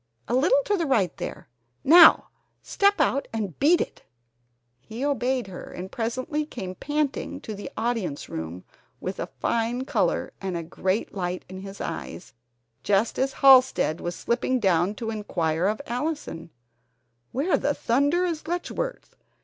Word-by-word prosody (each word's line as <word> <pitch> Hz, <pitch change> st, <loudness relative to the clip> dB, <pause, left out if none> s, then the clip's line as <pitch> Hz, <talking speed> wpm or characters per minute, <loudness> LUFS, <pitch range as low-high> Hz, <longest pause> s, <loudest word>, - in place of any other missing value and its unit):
A -, -, -2 dB
little 405 Hz, -, +4 dB
to 415 Hz, -, +2 dB
the 335 Hz, -3 st, -1 dB
right, 200 Hz, -, +2 dB
there -, -, -6 dB, 0.4 s
now 330 Hz, +3 st, +8 dB, 0.3 s
step 400 Hz, 0 st, +2 dB
out 275 Hz, -, +1 dB
and 210 Hz, -7 st, -4 dB
beat 320 Hz, +5 st, +5 dB
it!" -, -, -4 dB, 0.8 s
He 220 Hz, -, -5 dB
obeyed 260 Hz, -3 st, 0 dB
her, 190 Hz, -2 st, -8 dB
and 185 Hz, +2 st, -7 dB
presently 255 Hz, +7 st, -2 dB
came 195 Hz, -11 st, -6 dB
panting 295 Hz, +7 st, -2 dB
to 220 Hz, -, -6 dB
the 205 Hz, 0 st, -7 dB
audience 220 Hz, -10 st, -2 dB
room, 80 Hz, +3 st, -6 dB, 0.4 s
with -, -, -5 dB
a -, -, -3 dB
fine 235 Hz, +2 st, -1 dB
color, -, -, 0 dB
and 190 Hz, -3 st, -2 dB
a 170 Hz, -, -4 dB
great 185 Hz, +5 st, -2 dB
light 180 Hz, -2 st, -3 dB
in 185 Hz, 0 st, -8 dB
his 195 Hz, 0 st, -9 dB
eyes, 180 Hz, -, -6 dB, 0.5 s
just 205 Hz, +3 st, +1 dB
as 270 Hz, +1 st, +1 dB
Halsted 260 Hz, -, +6 dB
was 175 Hz, 0 st, -3 dB
slipping 250 Hz, +2 st, 0 dB
down 185 Hz, 0 st, +2 dB
to 225 Hz, +1 st, -4 dB
inquire 175 Hz, -5 st, -1 dB
of 215 Hz, +1 st, -1 dB
Allison: 250 Hz, -, -4 dB, 0.8 s
"Where 295 Hz, +8 st, -1 dB
in -, -, +3 dB
thunder 285 Hz, +5 st, +1 dB
is 325 Hz, -3 st, -3 dB
Letchworth? 355 Hz, +8 st, -4 dB
235 Hz, 150 wpm, -25 LUFS, 190-285 Hz, 0.8 s, now